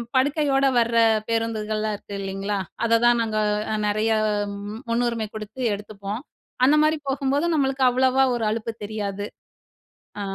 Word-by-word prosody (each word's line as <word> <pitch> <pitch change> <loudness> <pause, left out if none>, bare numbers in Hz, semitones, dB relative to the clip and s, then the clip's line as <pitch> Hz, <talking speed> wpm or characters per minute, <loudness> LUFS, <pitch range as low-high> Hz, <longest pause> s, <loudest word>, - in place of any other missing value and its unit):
படுக்கையோட 275 0 +2
வர 235 0 +2 0.3
பேருந்துகள்லாம் 215 -1 -1
இருக்கு 200 0 -9
இல்லிங்களா? 195 +1 -3 0.3
அததான் 235 +1 +4
நாங்க 220 -1 -1 0.4
அ - - +1
நெறய 215 +2 +1 0.2
அ - - 0 0.6
முன்னுரிமை 230 -1 0
கு 215 - -5
டுத்து 215 +5 -10
எடுத்துப்போம். 205 +1 -6 0.4
அந்த 275 +4 +6
மாரி 310 +1 +3
போகும்போது 275 +3 0
நம்மளுக்கு 270 -3 +1
அவ்வளோவா 260 +1 +3
ஒரு 235 - -2
அலுப்பு 225 +1 -2
தெரியாது. 205 -1 -4 0.9
அ - - -3
230 Hz, 135 wpm, -24 LUFS, 215-260 Hz, 0.9 s, அந்த